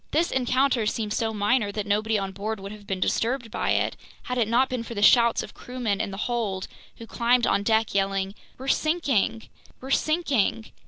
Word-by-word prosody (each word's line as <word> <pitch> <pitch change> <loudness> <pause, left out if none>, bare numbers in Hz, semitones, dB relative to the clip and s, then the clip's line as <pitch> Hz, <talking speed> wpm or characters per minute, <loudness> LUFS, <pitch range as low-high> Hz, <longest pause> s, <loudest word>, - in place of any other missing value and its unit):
This 330 +3 +1
encounter 255 -2 +1
seemed 215 -1 -2
so 225 0 0
minor 210 +1 +1
that 210 0 -3
nobody 215 +2 +1
on 195 -1 -3
board 205 +3 -4
would 195 +1 -7
have 210 -1 -12
been 190 -2 -2
disturbed 230 +4 -1
by - - -2
it, - - 0 0.3
had 250 0 -3
it 225 - +2
not 245 +4 +3
been 255 -2 -3
for 235 0 -7
the 205 - -1
shouts 235 +1 +5
of - - -10
crewmen 240 -5 -3
in 220 - -2
the 195 - -7
hold, 215 -6 -2 0.3
who 230 - -9
climbed 240 +1 +2
on - - +2
deck 220 +1 +1
yelling: 195 0 0 0.2
"We're 265 - -8
sinking! 275 - +1 0.3
We're 265 +1 -8
sinking!" 280 - +1
225 Hz, 200 wpm, -25 LUFS, 205-250 Hz, 0.3 s, shouts